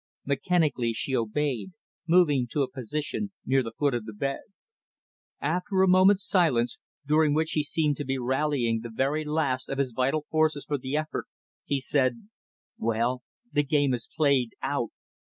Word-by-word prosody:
Mechanically, 140 Hz, -4 st, +1 dB
she 130 Hz, +3 st, -2 dB
obeyed; 130 Hz, -, -1 dB, 0.3 s
moving 155 Hz, -7 st, +4 dB
to 140 Hz, +4 st, 0 dB
a 130 Hz, -, -4 dB
position 150 Hz, -, -4 dB
near 135 Hz, +1 st, +3 dB
the 115 Hz, -3 st, -6 dB
foot 145 Hz, -2 st, +2 dB
of 120 Hz, -3 st, -2 dB
the 110 Hz, -, -7 dB
bed. 135 Hz, +6 st, -2 dB, 1.0 s
After 180 Hz, +5 st, +1 dB
a -, -, +4 dB
moment's 185 Hz, +2 st, +5 dB
silence, 130 Hz, -, +2 dB, 0.3 s
during 150 Hz, 0 st, +3 dB
which 160 Hz, +1 st, +1 dB
he 155 Hz, -, +1 dB
seemed 150 Hz, -1 st, 0 dB
to 145 Hz, -, -3 dB
be 135 Hz, 0 st, -2 dB
rallying 130 Hz, -2 st, 0 dB
the 120 Hz, -, -7 dB
very 135 Hz, +7 st, 0 dB
last 150 Hz, -4 st, -1 dB
of 135 Hz, -, -3 dB
his 135 Hz, -2 st, 0 dB
vital 135 Hz, +5 st, 0 dB
forces 155 Hz, -2 st, +1 dB
for 145 Hz, -2 st, -2 dB
the 130 Hz, +3 st, -2 dB
effort, 155 Hz, 0 st, -3 dB, 0.4 s
he 140 Hz, -, 0 dB
said, 130 Hz, -, 0 dB, 0.5 s
"Well 115 Hz, +3 st, 0 dB, 0.3 s
the 145 Hz, -, +3 dB
game 145 Hz, -2 st, +2 dB
is 120 Hz, -2 st, -4 dB
played 140 Hz, -6 st, +2 dB
out. 135 Hz, -4 st, -1 dB
140 Hz, 165 wpm, -27 LUFS, 125-155 Hz, 1.0 s, moment's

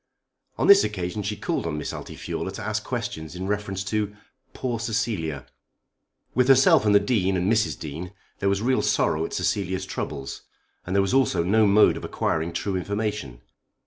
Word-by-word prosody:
On -, -, +1 dB
this 200 Hz, 0 st, +8 dB
occasion 95 Hz, -1 st, -3 dB
she 105 Hz, +1 st, -3 dB
called 85 Hz, -, -2 dB
on 75 Hz, -2 st, -3 dB
Miss 75 Hz, -, -4 dB
Altifiorla -, -, -5 dB
to -, -, -6 dB
ask -, -, -2 dB
questions 80 Hz, +2 st, -5 dB
in 90 Hz, +1 st, -4 dB
reference 100 Hz, -1 st, -2 dB
to 105 Hz, 0 st, -2 dB, 0.4 s
"poor 120 Hz, -3 st, -3 dB
Cecilia." 105 Hz, -, -2 dB, 0.9 s
With 125 Hz, 0 st, +3 dB
herself 130 Hz, -5 st, +6 dB
and 105 Hz, -, +5 dB
the -, -, +8 dB
Dean 100 Hz, -3 st, +1 dB
and 95 Hz, +5 st, +2 dB
Mrs. 110 Hz, 0 st, +1 dB
Dean 80 Hz, +4 st, -6 dB, 0.3 s
there 100 Hz, -, +1 dB
was 100 Hz, +2 st, 0 dB
real 130 Hz, +2 st, +2 dB
sorrow 80 Hz, +1 st, +1 dB
at -, -, -7 dB
Cecilia's 95 Hz, -1 st, -1 dB
troubles. 70 Hz, -7 st, -5 dB, 0.5 s
And 95 Hz, -, -2 dB
there 100 Hz, -, +4 dB
was 95 Hz, -, -1 dB
also 130 Hz, -10 st, +3 dB
no 105 Hz, +4 st, +4 dB
mode 100 Hz, +2 st, +5 dB
of -, -, -8 dB
acquiring 80 Hz, +1 st, -1 dB
true 95 Hz, +3 st, -2 dB
information. 100 Hz, -, -3 dB
100 Hz, 175 wpm, -25 LUFS, 90-110 Hz, 0.9 s, this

